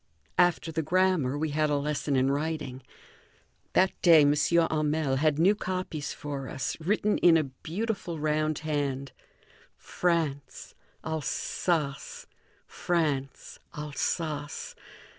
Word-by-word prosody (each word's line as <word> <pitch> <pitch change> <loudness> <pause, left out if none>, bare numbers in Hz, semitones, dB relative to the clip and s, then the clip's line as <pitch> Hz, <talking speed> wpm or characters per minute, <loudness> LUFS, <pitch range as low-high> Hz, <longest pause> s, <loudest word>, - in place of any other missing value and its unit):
After 175 -2 +3
the 160 0 -1
grammar, 170 -4 +1
we 155 0 -1
had 155 +1 +1
a 145 - +2
lesson 145 0 -1
in 130 +1 +3
writing. 145 -3 -3 0.9
That 190 0 +4
day 165 -3 +7
M. 145 0 +4
Hamel 155 -3 +1
had 150 +1 +2
new 180 +6 +5
copies 185 -7 -4
for 140 -2 -5
us, 145 -5 -3
written 205 +5 +1
in 170 -2 +6
a 155 - +2
beautiful 170 - -4
round 155 0 0
hand: 140 -3 -2 0.7
France, 160 -6 -2 0.3
Alsace, 155 -1 -2 0.4
France, 150 -6 -2 0.2
Alsace. 150 +1 -3
155 Hz, 110 wpm, -28 LUFS, 145-170 Hz, 0.9 s, day